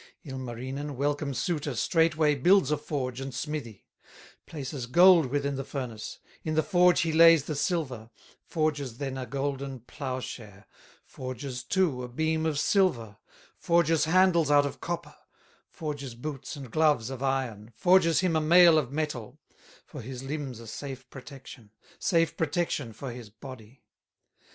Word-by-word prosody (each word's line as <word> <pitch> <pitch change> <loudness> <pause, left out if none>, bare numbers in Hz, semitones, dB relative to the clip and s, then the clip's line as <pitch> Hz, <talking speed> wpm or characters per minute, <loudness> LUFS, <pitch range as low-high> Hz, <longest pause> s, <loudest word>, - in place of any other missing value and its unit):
Ilmarinen, 130 +2 -5
welcome 145 +1 -1
suitor, 145 +2 -2
Straightway 160 +1 +2
builds 170 +2 +4
a 150 - +2
forge 135 -4 -4
and 135 0 -5
smithy, 130 -7 -5 0.6
Places 135 -4 -6
gold 175 +2 +6
within 140 +1 -1
the 135 - -3
furnace, 125 -6 -6 0.3
In 155 -1 -2
the 160 - +3
forge 180 -1 +4
he 165 -2 0
lays 165 -2 +7
the 155 - -4
silver, 145 - -2 0.3
Forges 145 -7 -2
then 135 -1 -4
a 130 -1 -5
golden 135 0 -3
plowshare, 125 -6 -7 0.4
Forges, 130 0 -6
too, 160 -3 +1
a 125 - -5
beam 160 +5 -1
of 155 -2 -1
silver, 145 - +1 0.4
Forges 165 -2 +2
handles 170 -2 +4
out 145 -1 +5
of 140 - -5
copper, 175 0 -5 0.5
Forges 145 -5 -6
boots 135 +3 -6
and 135 -5 -9
gloves 150 -6 +2
of 130 -1 -7
iron, 125 -5 -2
Forges 170 +5 +4
him 180 -3 +1
a 160 - +2
mail 170 0 +7
of 135 -4 -4
metal, 145 -7 -4 0.5
For - - -9
his 125 +2 -7
limbs 135 -4 -5
a 115 - -10
safe 130 +3 -7
protection, 135 -4 -11 0.3
Safe 165 -3 +1
protection 160 -6 -1
for 120 +4 -7
his 120 -3 -9
body. 120 +2 -12
140 Hz, 145 wpm, -28 LUFS, 125-160 Hz, 0.6 s, lays